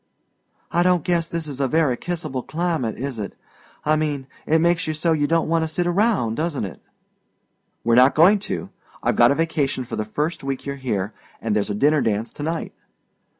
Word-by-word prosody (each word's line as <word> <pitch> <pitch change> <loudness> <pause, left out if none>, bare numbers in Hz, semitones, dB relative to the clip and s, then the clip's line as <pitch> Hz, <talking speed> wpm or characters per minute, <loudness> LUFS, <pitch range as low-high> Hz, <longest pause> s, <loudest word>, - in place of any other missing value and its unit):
"I 175 - +2
don't 180 -2 +3
guess 170 -2 +1
this 165 -1 -3
is 140 -3 -6
a 135 - +2
very 150 -3 +2
kissable 155 -5 -3
climate, 160 -8 -2
is 130 -2 -4
it? 100 - -5 0.5
I 155 +1 +4
mean, 150 -3 -1 0.2
it 160 - +4
makes 170 +1 +2
you 155 - -1
so 165 +2 +1
you 145 -2 +1
don't 165 +1 +2
want 165 0 +2
to - - -1
sit 175 +3 -1
round, 175 - +1
doesn't 155 -8 -1
it?" 90 -7 -9 1.0
"We're 115 - +2
not 130 +3 +6
going 185 +7 +6
to. - - -4 0.3
I've - - +2
got 120 0 +6
a - - +2
vacation 150 -5 0
for - - -5
the 110 - 0
first 150 +10 -3
week 135 -1 -3
you're 140 0 -3
here, 105 -6 -2 0.3
and 110 -2 -1
there's 105 - 0
a 105 - -1
dinner 145 +6 +3
dance 110 +1 -1
to - - -10
night." 160 +2 -3
150 Hz, 205 wpm, -22 LUFS, 125-165 Hz, 1.0 s, not